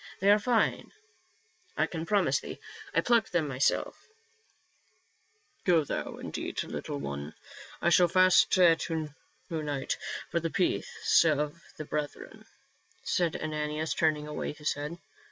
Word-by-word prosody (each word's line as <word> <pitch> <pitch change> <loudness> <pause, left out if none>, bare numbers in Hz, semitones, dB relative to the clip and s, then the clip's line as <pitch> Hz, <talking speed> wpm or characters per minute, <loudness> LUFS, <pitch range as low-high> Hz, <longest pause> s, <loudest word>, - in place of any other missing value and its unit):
They 200 +2 +5
are 210 - +6
fine, 230 +2 +1 0.9
I - - +3
can 165 -1 -5
promise 205 -2 +2
thee; - - -8 0.3
I - - +2
plucked 230 -5 +2
them 165 -4 +1
myself" 135 -1 -1 0.8
" 310 -9 -40
Go 170 -3 +5
thou - - -4
and - - -8
eat, - - -3
little - - -5
one; 70 +1 -6 0.5
I 170 - +3
shall 175 0 +6
fast 185 +1 +5
to 165 -3 +3 0.4
night 150 -4 -2 0.3
for 170 - +1
the 165 0 -2
peace 180 0 +2
of 150 0 0 0.2
the 155 - -6
brethren," 150 -1 -5 0.6
said 170 -3 0
Ananias, 155 0 -2
turning 155 -2 +1
away 150 - -4
his 150 0 -1
head. 150 +4 -6
160 Hz, 135 wpm, -29 LUFS, 150-180 Hz, 0.9 s, are